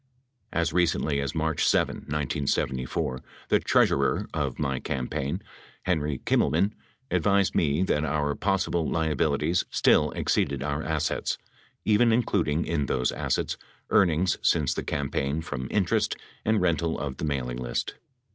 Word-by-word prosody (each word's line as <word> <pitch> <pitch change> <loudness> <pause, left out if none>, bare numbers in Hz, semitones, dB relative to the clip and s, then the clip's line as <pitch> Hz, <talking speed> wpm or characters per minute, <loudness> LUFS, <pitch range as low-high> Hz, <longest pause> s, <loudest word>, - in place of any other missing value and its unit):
As 85 -2 0
re 90 -1 +4
cently 75 -3 0
as 70 +3 -3
March 80 -1 0
7, - - +2
1974, 65 -3 -2 0.3
the - - +4
treasurer - - +2
of - - -2
my 70 -3 -1
campaign, 70 +9 -3 0.4
Henry 75 -6 0
Kimmelman, 95 +6 +2 0.4
advised 100 -2 +2
me 75 +2 +2
that 75 -5 +1
our 75 -1 0
possible 95 -3 0
liabilities 80 +1 +1
still - - +3
ex - - 0
ceeded 70 -1 0
our 70 +1 -1
assets, 80 -2 -1 0.5
even 110 +2 +4
including 85 -9 +1
in 75 -4 -1
those 65 -1 +1
assets - - -1 0.3
earnings 90 -1 +3
since - - +2
the - - -3
campaign 70 +1 -1
from 65 -5 -4
interest 95 -5 +1 0.3
and 110 -2 +2
rental 85 -2 +1
of 70 -2 -4
the - - -3
mailing 65 -4 -2
list. 60 -1 -2
75 Hz, 135 wpm, -27 LUFS, 70-85 Hz, 0.5 s, re